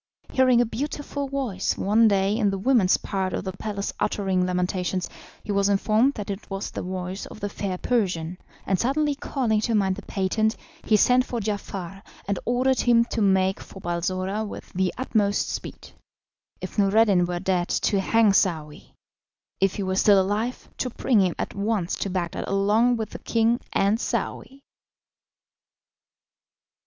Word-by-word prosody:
Hearing 255 -2 +4
a - - +3
beautiful 285 +3 -4
voice 260 -9 -2
one 220 +3 +4
day 200 0 +2
in 215 -3 +2
the 195 - -2
women's 210 -3 +3
part 190 -2 -3
of - - -2
the 190 - -3
palace 200 +1 -4
uttering 190 -3 0
lamentations, 180 0 -1 0.4
he 210 - -4
was 200 0 +2
informed 215 +7 +2
that 205 -2 -4
it 200 +1 -7
was 195 0 -4
the - - -5
voice 185 +1 -5
of - - -11
the 205 - -3
fair 195 -2 -4
Persian, 180 -7 -1 0.3
and 190 -2 0
suddenly 290 +4 +1
calling 255 -6 -1
to 225 +1 0
mind 190 -2 +1
the - - -7
patent, 215 +3 0 0.3
he 215 - +4
sent 250 +4 +4
for 245 -1 -4
Giafar, 195 -3 -5 0.3
and 200 -2 -1
ordered 255 +2 +2
him 235 -1 +4
to 225 - -1
make 190 -1 +2
for 195 - -11
Balsora 185 +4 -2
with 210 - -8
the 185 -1 +1
utmost 210 -5 0
speed - - -7 0.7
if - - -5
Noureddin 200 -3 +4
were 175 0 -2
dead, 180 -1 0
to 200 - +1
hang 225 0 +4
Saouy; 155 -6 -1 0.6
if 195 -1 +2
he 200 - -2
were 185 0 -1
still 200 0 +5
alive, 210 +6 -1
to 255 - -1
bring 235 -2 +2
him 180 -3 +1
at - - -4
once 200 -3 -1
to 200 - -3
Bagdad 180 -3 -3
along 215 +5 +2
with 220 -1 -4
the - - -7
king 230 +1 +1
and 200 +3 +2
Saouy. 270 +2 -3
200 Hz, 165 wpm, -25 LUFS, 190-230 Hz, 0.7 s, still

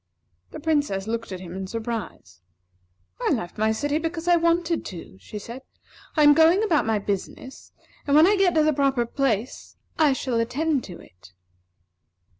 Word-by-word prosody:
The 315 - -9
Princess 290 -11 0
looked 230 -1 -4
at 185 -1 -6
him 175 -2 -9
in 190 0 -5
surprise. 230 - -6 0.8
"I - - 0
left 175 +3 -3
my 220 0 +2
city 290 +7 -1
because 330 +1 -4
I 350 - +5
wanted 335 0 +1
to," 165 - -9
she 210 - -9
said. 235 +5 -8 0.6
"I 305 - +5
am 295 0 +8
going 325 +6 +4
about 325 - +1
my 220 -1 +2
business, 205 +6 -6 0.4
and 285 - +3
when 310 +2 +7
I 405 +3 +4
get 385 -3 +2
to 310 - +4
the 310 0 +2
proper 270 -4 +1
place, 240 -2 -2 0.2
I 300 -3 +4
shall 255 -3 -2
attend 270 +5 0
to 175 -3 -10
it." 90 +1 -18
265 Hz, 175 wpm, -24 LUFS, 215-320 Hz, 0.8 s, am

